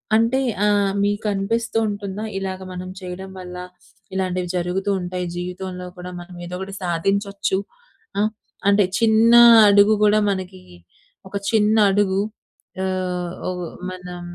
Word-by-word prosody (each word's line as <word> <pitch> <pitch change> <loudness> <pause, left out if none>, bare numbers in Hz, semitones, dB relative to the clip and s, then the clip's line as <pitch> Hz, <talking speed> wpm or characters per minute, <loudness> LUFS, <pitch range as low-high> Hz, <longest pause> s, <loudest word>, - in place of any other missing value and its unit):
అంటే 230 +4 +3 0.3
ఆహ్, 205 -1 +3
మీకనిపిస్తూ 205 +3 -1
ఉంటుందా? 200 0 -5
ఇలాగ 190 -1 -4
మనం 180 0 -6
చేయడం 185 +1 -7
వల్ల 180 0 -8 0.6
ఇలాంటివి 185 -1 -2
జరుగుతూ 180 +3 -1
ఉంటాయి. 180 0 -3
జీవితంలో 180 +1 -5
కూడా 180 0 -7
మనం 175 +1 -11
ఏదో 180 +1 -6
ఒకటి 190 +1 -6
సాధించొచ్చు 195 +3 0 0.6
ఆ! - - +3 0.5
అంటే 200 0 +5 0.2
చిన్న 225 0 +4 0.4
అడుగు 205 +1 +6
గూడా 210 0 +5
మనకి 185 -1 -4 0.7
ఒక 190 - -10 0.2
చిన్న 215 -1 +3 0.2
అడుగు 195 -1 +2 0.6
ఆహ్, 180 -2 -2 0.2
ఒక 185 - -3 0.4
మనం 180 -1 -8
190 Hz, 120 wpm, -21 LUFS, 180-205 Hz, 0.7 s, అడుగు